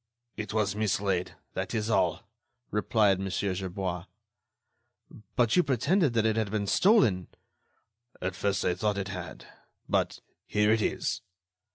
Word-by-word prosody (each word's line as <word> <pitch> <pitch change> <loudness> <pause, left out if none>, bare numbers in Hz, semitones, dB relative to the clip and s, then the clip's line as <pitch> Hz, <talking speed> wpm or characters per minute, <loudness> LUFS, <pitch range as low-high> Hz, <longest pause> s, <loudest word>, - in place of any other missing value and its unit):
"It 110 -1 -5
was 105 -2 0
mislaid. 100 -3 0 0.2
That - - -3
was 110 0 -1
all," 85 -4 +2 0.5
replied 105 -2 +3
Mon. 95 0 -3
Gerbois. 95 -2 -2 1.3
"But 120 -3 +3
you 180 - +6
pretended 140 - +2
that 115 -1 +2
it 110 0 +2
had 110 -2 0
been 105 0 -1
stolen." 105 - +4 0.9
"At 90 0 -3
first, 100 0 0
I 90 - +3
thought 100 +3 -1
it 100 0 -3
had... 90 -3 -7 0.4
but - - 0 0.3
here 105 0 +3
it 110 0 +3
is." - - -1
105 Hz, 140 wpm, -29 LUFS, 95-110 Hz, 1.3 s, you